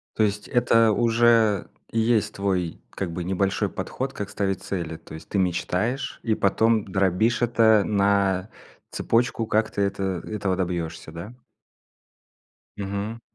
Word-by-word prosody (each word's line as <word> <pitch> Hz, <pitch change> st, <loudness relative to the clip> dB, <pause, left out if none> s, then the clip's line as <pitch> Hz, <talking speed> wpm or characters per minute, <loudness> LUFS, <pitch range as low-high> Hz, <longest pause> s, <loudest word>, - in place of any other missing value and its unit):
То 110 Hz, -, +2 dB
есть- 105 Hz, 0 st, -1 dB
это 115 Hz, -2 st, +4 dB
уже 115 Hz, -2 st, +3 dB, 0.2 s
есть 110 Hz, -2 st, +1 dB
твой, 95 Hz, -4 st, -1 dB
как 95 Hz, -3 st, -4 dB
бы, 85 Hz, +1 st, -4 dB
небольшой 95 Hz, +1 st, 0 dB
подход 135 Hz, +1 st, -4 dB
как 105 Hz, -1 st, -5 dB
ставить 95 Hz, -2 st, -2 dB
цели. 85 Hz, -5 st, -4 dB
То 80 Hz, -, -14 dB
есть 80 Hz, -, -10 dB
ты 100 Hz, -, -1 dB
мечтаешь, 95 Hz, +8 st, -1 dB
и 110 Hz, -2 st, +1 dB
потом 110 Hz, +2 st, +2 dB
дробишь 95 Hz, +5 st, +1 dB
это 110 Hz, -3 st, +4 dB
на 100 Hz, -1 st, +1 dB, 0.4 s
цепочку, 115 Hz, -1 st, 0 dB
как 110 Hz, +1 st, +1 dB
ты 100 Hz, -, -2 dB
это 100 Hz, 0 st, -2 dB, 0.2 s
этого 100 Hz, -3 st, -1 dB
добьешься, 85 Hz, -4 st, -3 dB
да? 95 Hz, +8 st, -8 dB, 1.4 s
Мгм. 100 Hz, +3 st, -4 dB
100 Hz, 135 wpm, -24 LUFS, 95-115 Hz, 1.4 s, это